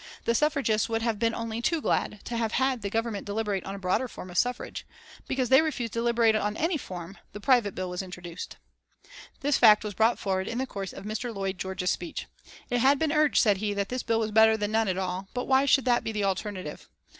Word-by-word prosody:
The 230 - +2
suffragists 265 -6 +1
would 225 0 -1
have 230 -3 0
been 230 0 +1
only 230 0 -4
too 330 +7 +1
glad 210 -7 -1
to 240 - -4
have 230 -1 -1
had 260 -2 +1
the 200 - -3
Government 225 -1 -2
deliberate 205 -2 -2
on 195 - -5
a - - -6
broader 195 +7 0
form 185 -5 -9
of 175 - -6
suffrage. 245 0 -2 0.4
Because 260 -2 -1
they 265 +3 +7
refused 270 -8 -3
to 230 - -1
deliberate 235 -1 +3
on 210 0 -1
any 330 +2 +1
form, 185 - -7
this 205 - -9
private 240 -6 +3
bill 185 - -3
was 180 +1 -3
introduced. 180 -2 -8 0.8
This 290 0 +2
fact 215 -2 +7
was 210 -1 -4
brought 225 +4 +3
forward 190 -1 -1
in 230 - -3
the 260 - 0
course 195 -6 -6
of - - -10
Mr. 220 +3 -3
Lloyd 195 -3 -3
George's 185 0 -1
speech. 175 - -4 0.5
It 245 - +2
had 275 +4 +5
been 315 +1 0
urged, 305 -1 +3
said 205 -4 +4
he, 205 +1 -2
that 200 0 -2
this 255 0 -2
bill 225 -1 0
was 220 -1 -1
better 220 +1 +6
than 205 0 -2
none 220 0 +2
at 185 -1 -1
all, 185 0 -3
but 250 - -2
why 265 +1 +4
should 270 -1 +4
that 245 -1 +3
be 225 - -2
the 210 -2 -2
alternative? 190 -4 -3
220 Hz, 235 wpm, -27 LUFS, 195-245 Hz, 0.8 s, they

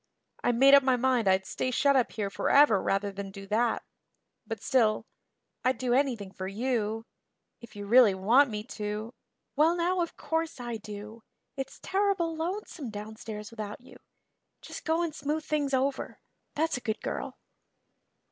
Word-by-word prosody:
I - - +3
made 270 +4 +6
up 280 - +9
my 260 -1 +3
mind 250 -3 +1
I'd 190 0 +3
stay 255 - -2
shut 280 +2 +3
up 255 -3 +2
here 205 -3 -3
forever 275 -3 +4
rather 200 +1 0
than 195 0 -6
do 195 0 -10
that. 225 +4 +1 0.6
But 225 -2 -4
still 230 -6 +2 0.6
I'd 255 +1 +2
do 250 -1 0
anything 245 -8 0
for 190 -1 -6
you 225 0 -1 0.5
if 235 -3 -14
you 205 0 -6
really 225 -2 +6
want 240 +9 +4
me 210 -1 -4
to 215 -1 -5 0.2
" - - -53
"Well 315 +4 +4
now, 355 +1 +1
of 335 - -3
course 325 -3 -2
I 240 -2 -4
do. 215 +1 -9 0.3
It's 270 -1 -6
terrible 385 -4 +1
lonesome 335 - -4
downstairs 215 0 -7
without 215 -2 -6
you. 245 - -15 0.6
Just - - -9
go 325 +1 +1
and 330 -3 -2
smooth 300 +2 -2
things 290 -2 0
over 265 +1 -1 0.4
that's 320 -2 +1
a - - -7
good 220 -2 -3
girl." - - -4
245 Hz, 165 wpm, -29 LUFS, 210-285 Hz, 0.6 s, up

